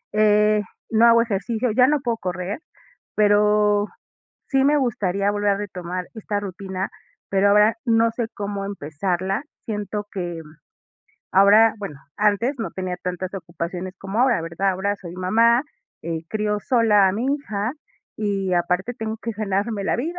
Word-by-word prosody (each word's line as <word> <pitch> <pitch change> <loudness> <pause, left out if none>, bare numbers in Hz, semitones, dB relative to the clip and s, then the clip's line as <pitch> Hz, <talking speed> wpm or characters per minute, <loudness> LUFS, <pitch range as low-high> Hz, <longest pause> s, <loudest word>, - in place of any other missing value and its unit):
Eh, 210 0 +4 0.3
no 225 +1 +5
hago 230 0 +6
ejercicio, 225 +3 -1
ya 250 +4 +5
no 295 +1 +2
puedo 235 -3 -1
correr, 185 - -4 0.6
pero, 210 0 +3 0.6
sí 270 -1 +2
me 295 +1 +4
gustaría 200 -6 0
volver 205 0 +1
a 200 - +2
retomar 180 -3 -5
esta 210 -2 -3
rutina, 190 -1 -5 0.4
pero 195 +1 +3
ahora, 210 +2 +5
no 230 -1 +3
sé 230 -1 -3
cómo 200 -1 -4
empezarla. 190 - -2 0.2
Siento 210 -1 -3
que, 175 -3 -4
mm, 155 +1 -17 0.8
ahora, 205 +4 +6
bueno, 160 -9 -7 0.2
antes 210 +6 +2
no 225 - -3
tenía 185 -1 -4
tantas 180 +1 -4
ocupaciones 175 +1 -5
como 195 +4 -2
ahora, 250 -8 +3
¿verdad? 170 +4 -1
Ahora 200 +2 -1
soy 175 -3 -9
mamá, 230 +7 +3 0.4
eh, 165 0 -3
crío 210 -1 -1
sola 210 -5 +4
a 185 - 0
mi 230 +6 -2
hija 215 -5 -3 0.4
y 195 -3 -1
aparte 180 +6 0
tengo 220 -1 -4
que 230 +1 -4
ganarme 205 0 -2
la - - +1
vida. 330 +9 -3
205 Hz, 155 wpm, -22 LUFS, 190-225 Hz, 0.8 s, hago